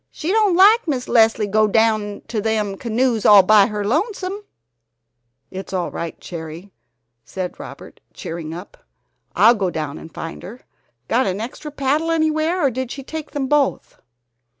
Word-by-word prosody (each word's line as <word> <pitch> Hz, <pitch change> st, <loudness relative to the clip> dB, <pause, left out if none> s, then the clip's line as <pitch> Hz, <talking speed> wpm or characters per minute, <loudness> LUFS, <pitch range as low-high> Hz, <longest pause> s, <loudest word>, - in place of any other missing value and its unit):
She 330 Hz, +3 st, -4 dB
don't 420 Hz, -4 st, +3 dB
like 410 Hz, +4 st, +5 dB
Miss 260 Hz, -5 st, -2 dB
Leslie 225 Hz, -2 st, +3 dB
go 215 Hz, +1 st, +2 dB
down 215 Hz, -1 st, +1 dB
to 220 Hz, -3 st, -2 dB
them 210 Hz, -2 st, -1 dB
canoes 235 Hz, +1 st, -1 dB
all 205 Hz, -2 st, +8 dB
by 205 Hz, +1 st, +5 dB
her 210 Hz, -1 st, -4 dB
lonesome." 380 Hz, -, -2 dB, 1.1 s
"That's 190 Hz, +1 st, -8 dB
all 180 Hz, -2 st, -2 dB
right, 170 Hz, -1 st, -6 dB
Cherry," 165 Hz, +3 st, -9 dB, 0.5 s
said 185 Hz, -2 st, -5 dB
Howard, -, -, -11 dB
cheering 165 Hz, -1 st, -7 dB
up; 175 Hz, +4 st, -9 dB, 0.6 s
"I'll 230 Hz, +3 st, +6 dB
go 200 Hz, -5 st, -1 dB
down 155 Hz, -3 st, -5 dB
and 160 Hz, -, -12 dB
find 165 Hz, -, -7 dB
her. 235 Hz, +7 st, -10 dB, 0.5 s
Got 245 Hz, +1 st, +1 dB
an 190 Hz, +1 st, -2 dB
extra 255 Hz, +7 st, -6 dB
paddle 295 Hz, +3 st, -1 dB
anywhere, 315 Hz, +1 st, +1 dB
or 270 Hz, -, +2 dB
did 260 Hz, +1 st, -4 dB
she 275 Hz, +2 st, -7 dB
take 315 Hz, +2 st, -7 dB
them 285 Hz, -2 st, -3 dB
both?" 285 Hz, 0 st, 0 dB
225 Hz, 160 wpm, -20 LUFS, 195-295 Hz, 1.1 s, all